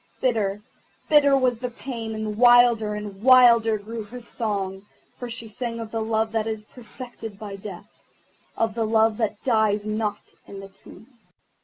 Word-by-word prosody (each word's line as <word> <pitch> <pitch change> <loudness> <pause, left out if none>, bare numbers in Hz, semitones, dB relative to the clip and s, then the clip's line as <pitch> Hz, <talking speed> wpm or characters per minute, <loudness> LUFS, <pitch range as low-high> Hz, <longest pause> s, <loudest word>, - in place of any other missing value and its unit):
Bitter, 210 -5 0 0.5
bitter 285 -2 +5
was 250 -3 +1
the 250 0 -3
pain, 230 -2 -6
and 215 -1 -4
wilder 240 -2 +5
and 205 -2 -7
wilder 235 -3 +6
grew 220 +3 -7
her 245 +4 -9
song, 205 -4 -4 0.3
for 245 - -6
she 230 0 -6
sang 230 +1 -5
of 225 -1 -7
the 225 - -2
Love 220 0 0
that 225 -1 -1
is 220 -1 -4
perfected 225 -2 -10
by 205 -1 -7
Death, 195 -1 -9 0.7
of 225 -1 0
the 225 +1 -1
Love 220 -1 +2
that 220 -2 -2
dies 215 -4 +1
not 215 -1 -3
in 200 - -9
the 195 0 -10
tomb. 195 +2 -16
220 Hz, 165 wpm, -24 LUFS, 210-240 Hz, 0.7 s, wilder